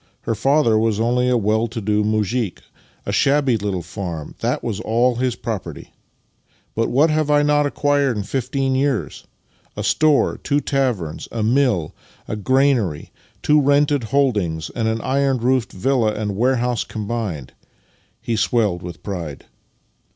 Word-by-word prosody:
Her -, -, -2 dB
father 125 Hz, -2 st, +3 dB
was 110 Hz, -1 st, +1 dB
only 125 Hz, +2 st, +1 dB
a 125 Hz, -, +3 dB
well 110 Hz, +1 st, +1 dB
to 115 Hz, +1 st, -6 dB
do 105 Hz, 0 st, +1 dB
muzhik. 110 Hz, 0 st, -1 dB, 0.4 s
A -, -, -2 dB
shabby 140 Hz, -3 st, +2 dB
little 100 Hz, -4 st, -2 dB
farm 85 Hz, -3 st, -6 dB
— -, -, -37 dB
that -, -, -1 dB
was 110 Hz, -4 st, -3 dB
all 120 Hz, +2 st, +1 dB
his 125 Hz, -1 st, 0 dB
property. 95 Hz, -, -6 dB, 0.8 s
But 115 Hz, +1 st, 0 dB
what 150 Hz, +5 st, +3 dB
have 155 Hz, -1 st, 0 dB
I 145 Hz, 0 st, +4 dB
not 145 Hz, 0 st, +3 dB
acquired 145 Hz, -4 st, +1 dB
in 105 Hz, -, -2 dB
fifteen 135 Hz, +3 st, -1 dB
years? 135 Hz, -2 st, -1 dB, 0.5 s
A -, -, -3 dB
store, 155 Hz, -3 st, +2 dB
two 145 Hz, 0 st, 0 dB
taverns, 125 Hz, -, -2 dB
a 115 Hz, -2 st, -2 dB
mill, 120 Hz, -, +1 dB, 0.3 s
a -, -, -3 dB
granary, 120 Hz, -, +1 dB, 0.3 s
two 150 Hz, 0 st, +4 dB
rented 145 Hz, -2 st, +2 dB
holdings, 105 Hz, -, 0 dB
and 115 Hz, -2 st, -2 dB
an 110 Hz, 0 st, -1 dB
iron 135 Hz, 0 st, +1 dB
roofed 125 Hz, 0 st, 0 dB
villa 115 Hz, +1 st, +1 dB
and 105 Hz, -2 st, -3 dB
warehouse 125 Hz, 0 st, +1 dB
combined." 105 Hz, -, -4 dB, 0.7 s
He 115 Hz, -, -2 dB
swelled 105 Hz, -5 st, +1 dB
with 90 Hz, -1 st, -9 dB
pride. 85 Hz, -8 st, -6 dB
115 Hz, 150 wpm, -20 LUFS, 105-135 Hz, 0.8 s, I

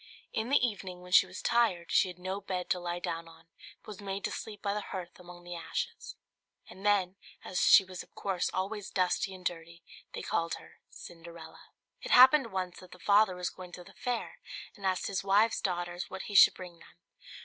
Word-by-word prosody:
In 220 Hz, +2 st, -2 dB
the 280 Hz, -, +5 dB
evening, 185 Hz, -5 st, -7 dB
when 180 Hz, -, -12 dB
she 185 Hz, -, +7 dB
was 180 Hz, -1 st, -9 dB
tired, 225 Hz, -8 st, +1 dB
she -, -, +4 dB
had 180 Hz, -1 st, -8 dB
no 190 Hz, +2 st, -4 dB
bed 185 Hz, -2 st, -4 dB
to 180 Hz, -, +2 dB
lie 175 Hz, 0 st, -3 dB
down 165 Hz, -1 st, -4 dB
on, 165 Hz, -1 st, -17 dB, 0.4 s
but -, -, -25 dB
was 210 Hz, -1 st, -8 dB
made 195 Hz, 0 st, -4 dB
to -, -, -1 dB
sleep 210 Hz, -2 st, -7 dB
by 200 Hz, -1 st, -1 dB
the 210 Hz, -, -2 dB
hearth 180 Hz, -3 st, -7 dB
among 175 Hz, 0 st, -12 dB
the 175 Hz, 0 st, -8 dB
ashes; 170 Hz, -, -5 dB, 0.5 s
and 190 Hz, -, -13 dB
then, 195 Hz, -2 st, +2 dB, 0.3 s
as 180 Hz, -, -2 dB
she -, -, +8 dB
was 185 Hz, -1 st, -7 dB
of -, -, -17 dB
course 190 Hz, -3 st, -1 dB
always 200 Hz, +2 st, -3 dB
dusty 185 Hz, +1 st, 0 dB
and 180 Hz, -1 st, -14 dB
dirty, 170 Hz, 0 st, -5 dB, 0.3 s
they -, -, -5 dB
called 165 Hz, 0 st, -1 dB
her -, -, -15 dB
Cinderella. 170 Hz, -1 st, -12 dB, 0.4 s
It -, -, -7 dB
happened 260 Hz, -1 st, +7 dB
once 185 Hz, -2 st, -3 dB
that 185 Hz, -, -14 dB
the -, -, -12 dB
father 200 Hz, +1 st, +4 dB
was 180 Hz, 0 st, -3 dB
going 180 Hz, -1 st, -11 dB
to 180 Hz, -, -9 dB
the -, -, -16 dB
fair, 245 Hz, -1 st, -4 dB, 0.4 s
and 200 Hz, -3 st, -3 dB
asked 185 Hz, -1 st, 0 dB
his 195 Hz, -, -2 dB
wife's 205 Hz, +3 st, +3 dB
daughters 175 Hz, -1 st, -3 dB
what 190 Hz, -, -6 dB
he 205 Hz, -, -7 dB
should 195 Hz, -, +8 dB
bring 175 Hz, -2 st, -10 dB
them. -, -, -18 dB
185 Hz, 215 wpm, -31 LUFS, 175-200 Hz, 0.5 s, she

